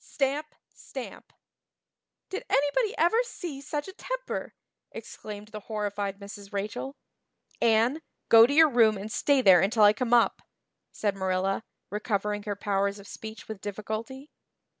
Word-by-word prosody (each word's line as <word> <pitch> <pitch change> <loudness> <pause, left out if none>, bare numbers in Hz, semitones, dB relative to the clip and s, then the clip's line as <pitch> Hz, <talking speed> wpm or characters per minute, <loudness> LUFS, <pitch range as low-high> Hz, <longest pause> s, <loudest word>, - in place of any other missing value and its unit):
Stamp! 290 +2 -2 0.2
Stamp! - - -9 1.0
"Did 385 - -4
anybody 290 - +1
ever 355 +8 +4
see 345 - -6
such 290 +2 -4
a 380 - -8
temper!" - - -5 0.4
exclaimed 210 0 -9
the 215 - -7
horrified 205 -2 -3
Mrs. 200 0 -10
Rachel. 210 +7 -4 0.7
"Anne 235 +7 +3 0.3
go 225 0 +8
to 280 - -1
your 320 -1 +7
room 225 -3 +4
and 205 +3 -7
stay 280 +1 +2
there 185 -4 +7
until 215 +3 +3
I 205 0 +8
come 235 +2 -2
up," 240 -1 +4 0.5
said 205 -2 -1
Marilla, 190 +2 0 0.3
recovering 210 0 -1
her 205 - -1
powers 200 0 0
of 200 0 -12
speech 220 0 -9
with 215 -3 -7
difficulty. 220 +7 -6
220 Hz, 140 wpm, -28 LUFS, 205-275 Hz, 1.0 s, go